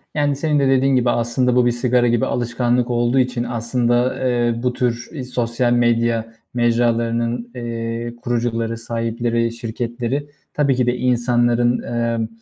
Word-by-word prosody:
yani 145 -1 +1
senin 150 +1 +1
de 140 - +2
dediğin 135 0 +3
gibi 125 -1 +2
aslında 120 +2 +1
bu 125 -1 +4
bir 120 - +3
sigara 120 0 +2
gibi 120 -1 +2
alışkanlık 120 0 0
olduğu 120 +2 +2
için 125 -1 0
aslında, 120 +1 0
eee, 120 -1 +1
bu 125 -1 +1
tür 125 +4 -3
sosyal 120 0 0
medya 115 -1 +1 0.2
mecralarının, 120 0 0
eee, 115 0 -4
kurucuları, 115 -1 -1
sahipleri, 115 0 -1
şirketleri 120 +4 -4 0.2
tabii 140 -3 +2
ki 125 -1 +1
de 125 0 +1
insanların, 120 -1 +2
eee, 115 -1 -1
120 Hz, 140 wpm, -20 LUFS, 115-125 Hz, 0.2 s, bu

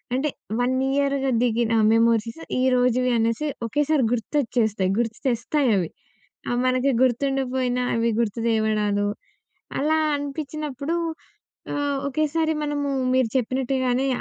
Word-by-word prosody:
అంటే 280 +4 0 0.3
1 250 +1 +1 0.2
ఇయర్‌గా 275 -1 +1
దిగిన 235 -1 +1 0.2
మెమోరీస్ 230 +4 +2 0.2
ఈ - - +2
రోజువి 250 0 +2
అనేసి 230 +6 0 0.2
ఒకేసారి 290 +4 +1
గుర్తొచ్చేస్తాయి. 225 -6 0
గుర్తుతెస్తాయవి. 230 - 0 0.6
అవి 245 - 0
మనకి 255 +2 +2
గుర్తుండకపోయినా 260 -1 0
అవి 230 0 +1
గుర్తు 230 -1 -1
తేవడాలు 215 -2 +1 0.7
అలా 310 +3 +2 0.2
అనిపించినప్పుడు 290 +1 -4 0.8
ఆహ్, 285 -1 -1
ఒకేసారి 310 +3 0
మనము 290 -1 -2 0.3
మీరు 260 -3 +3
చెప్పినట్టుగానే 260 +1 0
255 Hz, 100 wpm, -24 LUFS, 230-280 Hz, 0.8 s, మీరు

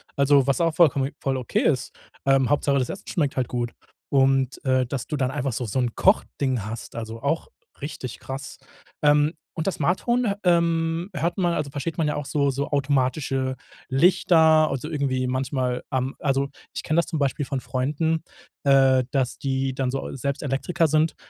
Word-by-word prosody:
Also 140 -1 +4
was 140 +3 +2
auch 165 -1 +2
vollkommen 140 -5 +3
voll 135 -1 -1
okay 125 - -1
ist. - - +1 0.3
Ähm, 135 -2 +3
Hauptsache, 140 -1 +2
das 125 - -1
Essen 195 - -7
schmeckt 145 -8 -1
halt 125 - +1
gut. 120 -1 -2 0.4
Und, 135 -1 +2
äh, 130 -1 +3
dass 125 0 -4
du 150 - -2
dann 130 -1 0
einfach 135 -3 -2
so 125 - -3
so 110 +5 -2
'n 120 -2 0
Kochding 130 - +1
hast, 115 +2 -7
also 115 0 -6
auch 160 +4 -1 0.3
richtig 130 -4 -6
krass. 135 +1 -7 0.5
Ähm, 150 +2 +4 0.2
und 160 -3 -3
das 195 - 0
Smart-Home, 200 +7 +1
ähm, 170 0 +2
hört 170 +5 -1
man, 175 -2 +1
also 140 - -2
versteht 150 +3 -4
man 160 - +1
ja 150 - -1
auch 145 - -4
so 140 -1 +1
so 140 +2 -3
automatische 135 -1 0 0.3
Lichter, 160 0 +5
also 135 +3 -3
irgendwie 130 -4 -1
manchmal 130 -1 -1
am 130 +1 -1
also 135 -1 +1 0.3
ich - - -4
kenne 155 - 0
das - - +1
zum 165 -2 -3
Beispiel 140 +1 0
von 135 -1 -2
Freunden, 150 +6 -1 0.4
äh, 135 -2 +5
dass 130 -3 0
die 135 -1 -1
dann 130 -1 -1
so 135 +1 -4
selbst 140 +1 -3
Elektriker 160 +5 0
sind, 155 +2 +2
140 Hz, 185 wpm, -24 LUFS, 130-155 Hz, 0.5 s, Lichter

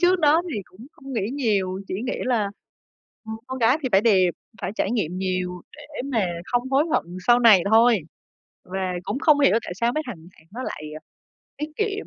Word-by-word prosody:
trước 365 +1 +4
đó 315 +1 +4
thì 210 - -2
cũng 190 +9 -15
không 270 0 -11
nghĩ 215 -3 -1
nhiều, 200 -8 0
chỉ - - -3
nghĩ - - -1
là, 225 -6 0 0.8
ừm, 220 0 -5
con 260 - -5
gái 250 +5 +3
thì 260 - 0
phải 195 - +6
đẹp, 195 -5 +4 0.3
phải 180 - -2
trải - - 0
nghiệm 185 -7 -1
nhiều 185 -1 -2 0.2
để 295 -2 -8
mà 235 -8 0 0.2
không 245 +5 -1
hối 275 +3 +3
hận - - +3 0.2
sau 240 0 +6
này 220 -6 +7
thôi. 230 0 +5 0.7
Và 190 +1 -5 0.2
cũng 210 +8 -3
không 300 -1 +4
hiểu 275 -6 +5
tại - - -5
sao 235 +3 +1
mấy 310 - 0
thằng 240 - -6 0.2
bạn 160 - -23
nó 250 - -5
lại, 155 - -6
à, - - -9 0.6
tiết 300 +1 -4
kiệm, 420 -1 -2
235 Hz, 210 wpm, -23 LUFS, 195-275 Hz, 0.8 s, này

